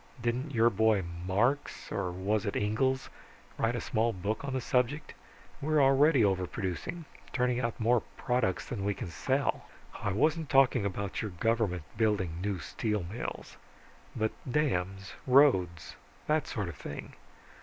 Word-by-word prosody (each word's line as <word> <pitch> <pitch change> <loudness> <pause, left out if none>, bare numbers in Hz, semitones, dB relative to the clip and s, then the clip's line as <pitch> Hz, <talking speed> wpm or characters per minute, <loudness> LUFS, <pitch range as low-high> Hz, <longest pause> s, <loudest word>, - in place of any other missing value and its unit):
Didn't 120 +5 -1
your 115 +1 +5
boy 110 -1 +3 0.2
Marx, 120 +9 0
or 90 - -1
was 100 +4 -1
it 100 - -2
Engels, 130 +6 +1 0.5
write - - +1
a - - -1
small 115 +2 +1
book 105 +4 -3
on 140 - -3
the 130 - 0
subject? 125 +4 0 0.5
We're 155 +1 +2
already 135 -1 +5
overproducing 95 - -2 0.3
turning 125 -2 +1
out 115 -2 -2
more 120 +1 +3 0.2
products 125 -7 0
than 105 -5 -4
we 100 0 0
can 85 - -6
sell." 135 +10 0 0.4
"I 100 - 0
wasn't 155 - +1
talking 130 -6 +4
about 100 0 -3
your 110 - -3
government 100 -2 0
building 95 -7 +1
new 100 -1 -1
steel 100 +4 -2
mills. 105 +8 -6 0.6
But 110 -1 0 0.2
dams, 95 -10 -1
roads, 95 - +4 0.3
that 155 -1 +1
sort 100 -5 -3
of 85 - -7
thing. - - -7
110 Hz, 145 wpm, -30 LUFS, 95-130 Hz, 0.6 s, your